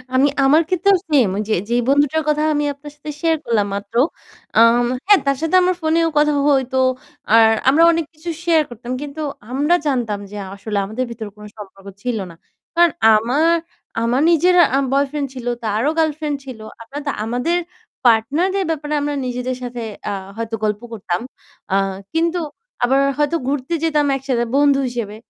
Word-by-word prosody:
আমি 270 +2 +5 0.2
আমার 300 +4 +5
ক্ষেত্রেও 380 +1 +3
সেম 270 -9 +4
ওইযে 215 +1 -1 0.2
যেই 240 +1 +2
বন্ধুটার 285 +2 +3
কথা 300 0 +1
আমি 295 0 0
আপনার 290 +1 -12
সাথে 300 +1 -7
শেয়ার 325 -1 +2
করলাম 220 -4 +1
মাত্র। 200 +2 -7 0.7
আম 235 +1 +5 0.2
হ্যাঁ 410 -2 +7
তার 275 -1 +2
সাথে 325 +2 +1
আমার 365 0 +2
ফোনেও 325 +1 +2
কথা 300 0 +4 0.2
হইতো। 265 -2 +1 0.6
আর 225 -1 +6 0.2
আমরা 310 +5 +5
অনেক 330 -1 -1
কিছু 315 +2 -8
শেয়ার 330 -3 +3
করতাম। 240 +1 -8
কিন্তু 295 +1 -6 0.3
আমরা 290 +6 +2
জানতাম 235 -7 -1
যে 210 - -7 0.2
আসলে 205 +1 -4
আমাদের 220 +6 -3
ভিতরে 220 -2 -7
কোন 210 - -11
সম্পর্ক 195 -1 -12 0.2
ছিল 245 -2 -1
না। - - -14 0.4
কারণ 340 0 +5 0.2
আমার 255 +10 +2 0.5
আমার 240 +4 +1
নিজেরা 355 +2 +5
আ - - +4 0.2
বয়ফ্রেন্ড 280 +1 0
ছিল, 250 -2 -7 0.2
তারও 220 +6 +1
গার্লফ্রেন্ড 305 -2 0
ছিল। 255 -4 -8 0.2
আমাদে 285 +5 -6 0.2
আমাদের 250 +10 0 0.5
পার্টনারদের 300 - +2
ব্যাপারে 300 -2 -3
আমরা 290 0 -2
নিজেদের 250 +1 -3
সাথে 245 -1 -5 0.3
আ - - -2 0.2
হয়তো 225 0 -3
গল্প 210 +1 -1
করতাম। 185 -5 -3 0.5
আ - - +3 0.4
কিন্তু 335 +2 +1 0.4
আবার 265 +3 +3 0.2
হয়তো 295 +2 +1
ঘুরতে 275 +2 -2
যেতাম 300 -2 +2
একসাথে 260 -3 -1
বন্ধু 280 -1 +4
হিসেবে। 230 -4 -5
275 Hz, 165 wpm, -19 LUFS, 235-310 Hz, 0.7 s, হ্যাঁ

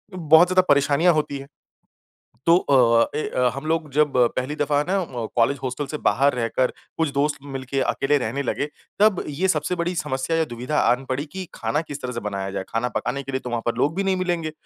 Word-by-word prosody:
बहुत 160 0 +5
ज़्यादा 185 0 +4
परेशानियाँ 145 +4 +4
होती 150 -2 -1
है। 135 0 -9 1.0
तो 170 +1 +6
अ, 120 -8 +4
इ - - 0
अ, 125 -1 +1
हम 140 +3 -6
लोग 160 -2 0
जब 150 0 +2 0.3
पहली 130 +4 -2
दफ़ा 145 0 +1
ना 195 +2 +1
वो 120 -3 -4
कॉलेज 120 +4 +3
हॉस्टल 130 +3 -3
से 150 - -4
बाहर 140 -1 +2
रहकर 125 +1 0 0.3
कुछ 160 -2 +1
दोस्त 145 +1 +1
मिल 135 -2 -6
के 135 - 0
अकेले 145 +1 +1
रहने 135 +3 -2
लगे, 140 - -1 0.3
तब 210 -3 +4
ये 160 +6 -1
सबसे 180 -1 0
बड़ी 175 +1 -2
समस्या 150 0 -1
या 160 - +2
दुविधा 125 +4 -2
आन 125 +2 +2
पड़ी 135 +4 -1
कि 190 -1 -5
खाना 150 - -1
किस 145 -3 -8
तरह 125 - -4
से 120 - -3
बनाया 100 -2 -4
जाए? 95 -1 -3
खाना 120 +2 -1
पकाने 140 +1 -3
के 135 - -7
लिए 130 - -1
तो 125 - -6
वहाँ 120 -1 -2
पर 120 - 0
लोग 150 +6 +1
भी 195 - 0
नहीं 190 -1 +1
मिलेंगे 175 -4 -1
140 Hz, 225 wpm, -23 LUFS, 125-160 Hz, 1.0 s, तो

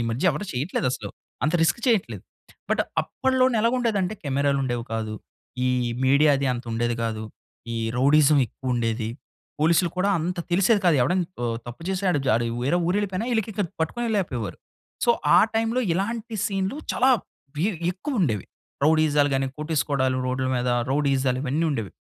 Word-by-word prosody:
మధ్య 115 +5 -3
ఎవరు 160 +7 -4
చేయట్లేదసలు. 130 -1 -2 0.3
అంత 155 +3 +1
రిస్క్ 165 +8 +2
చేయట్లేదు. 225 -5 +1 0.5
బట్ - - +2 0.2
అప్పట్లో‌నెలాగుండేదంటే 235 -5 +1
కెమెరాలుండేవి 135 -4 0
కాదు. 110 -1 -3 0.5
ఈ - - +3 0.4
మీడియా 140 +3 +5
అదీ 135 0 -1
అంతుండేది 120 -1 -2
కాదు. 110 -1 -2 0.5
ఈ - - -2 0.2
రౌడీయిజం 145 +3 +5
ఎక్కువుండేది. 115 -2 -2 0.5
పోలీసులకి 170 +2 +3
కూడా 190 +2 +2
అంత 175 +3 -3
తెలిసేది 195 +4 +3
కాదు. 165 -4 +5
ఎవడన్ 180 +8 +2 0.2
ఆహ్, 115 -1 -1
తప్పు 120 +7 -9
జేసినాడు 185 -5 +1
వాడు 120 +1 +2 0.2
వేరే 145 +7 +2
ఊరెళ్ళిపోయినా 200 +3 -1
ఈళ్ళకికన్ 210 -4 -1
పట్టుకునే 235 +9 -1
లేపోయేవారు. 125 - -3 0.5
సో, 240 - +4 0.3
ఆ - - +9 0.2
టైమ్‌లో 225 +2 +1
ఇలాంటి 220 +5 -2
సీన్‌లు 195 +4 -2 0.2
చాలా 260 +2 +3 0.5
బీ 165 - +1 0.3
ఎక్కువుండేవి. 180 - -1 0.4
రౌడీయిజాలు 150 -2 +3
గాని, 135 0 +1
కొట్టేసుకోడాలు 140 -4 0
రోడ్ల 130 +1 -1
మీద, 125 0 -1 0.2
రౌడీయిజాలు, 135 -2 +1
ఇవన్నీ 145 +4 0
ఉండేవి. 115 -9 -3
150 Hz, 135 wpm, -24 LUFS, 130-195 Hz, 0.5 s, ఆ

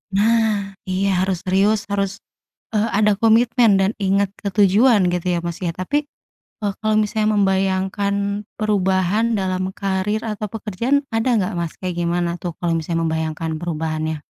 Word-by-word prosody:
Nah. 215 -1 +2 0.2
Iya 190 +1 0
harus 190 -2 -2
serius, 200 +3 +2
harus, 200 -1 0 0.6
eee, 215 +2 +2
ada 210 -1 +4
komitmen 230 0 +4
dan 195 +1 +2
ingat 195 0 +1
ke 205 - -5
tujuan 205 -1 +4
gitu 180 0 -2
ya, - - 0
Mas, 170 -1 -4
ya. 170 -3 -3
Tapi, 285 +12 -1 0.6
eee, 205 -1 0
kalau 215 0 +1
misalnya 215 0 +1
membayangkan 195 +1 +1 0.4
perubahan 205 +1 +1
dalam 185 -1 -2
karier 200 +2 -1
atau 215 -1 -3
pekerjaan, 225 +6 -1
ada 225 +2 0
nggak 200 0 -1
Mas, 170 -2 -3
kayak 180 -2 -3
gimana 170 0 -1
tuh 175 -3 -5
kalau 170 -1 0
misalnya 165 +1 -2
membayangkan 160 0 -2
perubahannya? 155 -2 -3
195 Hz, 150 wpm, -20 LUFS, 180-215 Hz, 0.6 s, ada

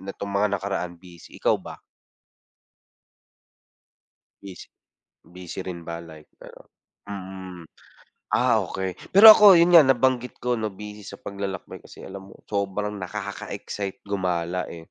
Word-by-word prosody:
netong 100 +1 -7
mga 100 0 +1
nakaraan, 90 -3 -4
busy. 85 -1 -15
Ikaw - - +2
ba? - - -10 2.7
Bis 95 -2 -11 0.6
busy 90 +1 -9
rin 85 -2 -7
ba 85 0 -6
life? 80 -2 -14
Pero - - -15 0.4
mm. 95 -3 -8 0.7
Ah, 120 -3 +3
okey. 95 -1 -4 0.2
Pero 215 +3 +11
ako 210 -2 +9
yun 170 +1 +5
nga 170 -2 +9
nabanggit 130 -1 +1
ko 125 -1 0
'no, 110 - -2
busy 105 0 -10
sa - - -9
paglalakbay 100 -2 -7
kasi - - -15
alam 95 0 -10
mo 95 - -15 0.2
sobrang 105 0 -2
nakaka-excite 100 0 -6
gumala, 90 -3 -2
eh, 85 -1 -11
100 Hz, 130 wpm, -24 LUFS, 90-105 Hz, 2.7 s, Pero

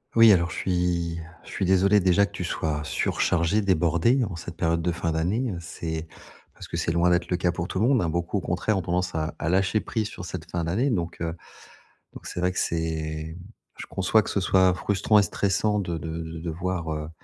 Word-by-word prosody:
Oui 115 -1 +8
alors 85 -2 +2
je - - -6
suis 90 -2 -1 0.2
je - - -12
suis 95 - -1
désolé 95 +2 +4
déjà 95 +1 +4
que 100 - -12
tu 95 - -5
sois 75 -4 -2
surchargé, 85 +6 +1
débordé 95 - +2
en 90 - -6
cette 85 +1 -8
période 85 -1 +1
de 90 +1 0
fin 85 -1 -2
d'année, 100 +10 0
heu, 90 - -4
c'est 80 -1 -5 0.5
parce - - -10
que - - -4
c'est - - 0
loin 85 +1 +3
d'être 85 0 +1
le 90 - +1
cas 90 0 +1
pour 85 +1 -4
tout 95 - -3
le 110 - +3
monde 130 -3 +3
hein. 85 - 0
Beaucoup 85 +4 -1
au - - -1
contraire, 90 +5 0
ont - - -2
tendance 90 +1 -1
à 80 +1 -2
à 80 - -2
lâcher 95 +4 +2
prise 110 -2 -2
sur 90 - -8
cette 85 -1 -7
fin 85 -1 -2
d'année 100 +12 +1
donc 85 -10 -2
heu, 85 -1 -2 0.8
donc - - -11
c'est - - -5
vrai 90 +1 +1
que - - -2
c'est 80 -1 -2 0.4
je - - -7
conçois 95 +4 +2
que - - -6
ce - - 0
soit 95 -1 +4
frustrant 100 +3 +2
et - - +4
stressant 105 +1 0
de 85 -4 -3
de 80 0 -5
de 80 0 -7
devoir, 85 0 -3
heu, 75 0 -4
90 Hz, 230 wpm, -25 LUFS, 85-95 Hz, 0.8 s, Oui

